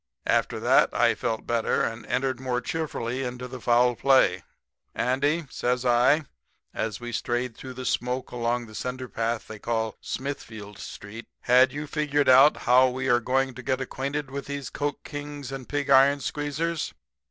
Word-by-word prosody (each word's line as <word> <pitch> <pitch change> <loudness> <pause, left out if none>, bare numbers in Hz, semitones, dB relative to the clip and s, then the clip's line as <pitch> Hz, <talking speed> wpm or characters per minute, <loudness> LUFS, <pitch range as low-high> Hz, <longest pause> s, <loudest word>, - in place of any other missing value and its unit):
After - - +1
that - - +4
I - - +4
felt 110 -1 -3
better 115 -1 +1
and 115 +1 -4
entered 130 -1 -1
more 130 -2 -1
cheerfully 135 -4 -3
into 125 -1 -4
the 125 0 -9
foul 120 +1 +3
play. 130 -9 +4 0.5
"'Andy,' 145 +6 +1
says 125 +1 -1
I, 125 +6 +4 0.5
as 110 -2 -3
we 120 0 -6
strayed 120 0 -2
through 130 -1 -9
the 130 0 -7
smoke 125 +1 -1
along 120 0 -1
the 110 - -14
cinderpath 120 -2 -3
they 110 -1 -9
call 110 -1 -2
Smithfield 110 -7 -6
street, 110 +4 -9
'had 125 +1 +5
you 150 +1 -5
figured 145 -1 0
out 135 +4 +7
how 130 +1 +6
we 130 +1 -3
are 120 0 +5
going 130 +2 0
to 130 - -9
get 130 +1 -1
acquainted 135 +2 -4
with 140 0 -5
these 140 -3 -5
coke 145 0 -3
kings 145 -2 -7
and 135 -2 -7
pig 145 -1 -1
iron 140 +1 +6
squeezers? 150 - -3
130 Hz, 165 wpm, -26 LUFS, 120-140 Hz, 0.5 s, out